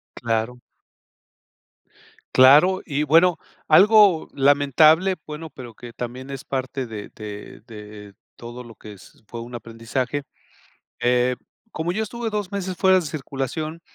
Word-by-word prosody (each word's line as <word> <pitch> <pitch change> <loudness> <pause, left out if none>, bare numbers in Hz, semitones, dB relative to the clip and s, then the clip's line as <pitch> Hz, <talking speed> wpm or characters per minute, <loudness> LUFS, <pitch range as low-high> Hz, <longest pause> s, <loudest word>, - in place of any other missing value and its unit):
Claro. 115 +1 -2 1.8
Claro. 150 +9 +6
Y 145 -2 -1
bueno, 165 +4 +4 0.3
algo 200 0 +5
lamentable, 145 +6 +4
bueno, 155 +1 -8
pero 120 -5 -11
que 120 +1 -12
también 125 +2 -7
es 135 -1 -7
parte 130 0 -4
de 110 -3 -8
de 105 -1 -9
de 105 -2 -11 0.2
todo 120 +1 -9
lo 115 -2 -14
que 105 +1 -12
es 100 +3 -18
fue 115 +1 -7
un 120 +1 -9
aprendizaje. 120 +5 -4 0.8
Eh, 125 +1 +1 0.3
como 160 +2 -3
yo 215 - -2
estuve 230 +1 -5
2 210 -2 -4
meses 190 -2 -4
fuera 190 0 +4
de 165 - -6
circulación 155 +3 -5
135 Hz, 135 wpm, -22 LUFS, 120-165 Hz, 1.8 s, Claro